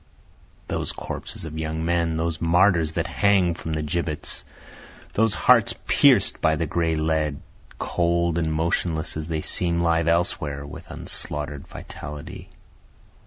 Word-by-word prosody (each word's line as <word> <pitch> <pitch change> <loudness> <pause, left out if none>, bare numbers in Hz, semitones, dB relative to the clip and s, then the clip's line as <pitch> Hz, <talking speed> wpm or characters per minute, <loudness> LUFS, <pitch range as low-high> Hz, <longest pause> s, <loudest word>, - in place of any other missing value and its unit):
Those - - -2
corpses - - -5
of 80 0 -6
young 80 0 -2
men, 85 -1 +1
Those 80 0 -2
martyrs 85 -1 +3
that 80 0 -1
hang 95 0 +3
from 80 -1 -5
the 75 0 -1
gibbets, 75 0 -3 0.7
those 110 -3 +3
hearts 80 - +4
pierc'd - - +4
by 80 0 +3
the 80 - -1
gray 80 +1 0
lead, 80 -2 0 0.4
Cold 85 -1 +1
and 80 -1 0
motionless 80 0 -1
as 80 0 -4
they 80 -2 -2
seem 85 -1 +3
live 85 -1 +2
elsewhere 75 -4 0
with 70 - -10
unslaughter'd 75 -1 -5
vitality. 85 +6 -9
80 Hz, 135 wpm, -24 LUFS, 80-85 Hz, 0.7 s, hearts